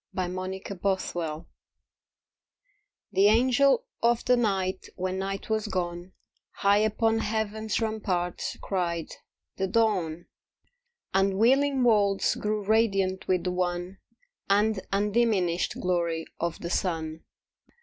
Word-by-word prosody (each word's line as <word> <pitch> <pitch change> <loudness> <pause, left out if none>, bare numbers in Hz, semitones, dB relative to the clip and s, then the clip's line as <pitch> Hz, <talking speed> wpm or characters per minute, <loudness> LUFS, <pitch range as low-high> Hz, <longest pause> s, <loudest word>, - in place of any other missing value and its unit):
THE 185 - -2
UNSEEN 185 +1 -5
MIRACLE 175 -5 -2 1.7
The 195 +2 +4
Angel 260 - +4 0.2
of 235 0 +2
the 250 - +5
night 195 -5 -1
when 185 0 -2
night 195 0 -4
was 220 0 -1
gone 175 -1 -4 0.4
High 200 +1 +3
upon 225 +1 +2
Heaven's 220 0 -1
ramparts, 200 -6 -2
cried, 170 -4 -2 0.5
"The 190 - 0
Dawn!" 185 -6 0 0.9
And 195 0 +2
wheeling 265 +4 +3
worlds 205 -4 +3
grew 210 0 -2
radiant 195 -3 +1
with 180 -2 +1
the 180 - -1
one 180 +1 -2 0.5
And 210 +1 +3
undiminished 200 -4 +1
glory 170 -3 0
of 170 -1 -2
the 170 - -4
sun. 160 -4 -2
195 Hz, 110 wpm, -27 LUFS, 180-220 Hz, 1.7 s, the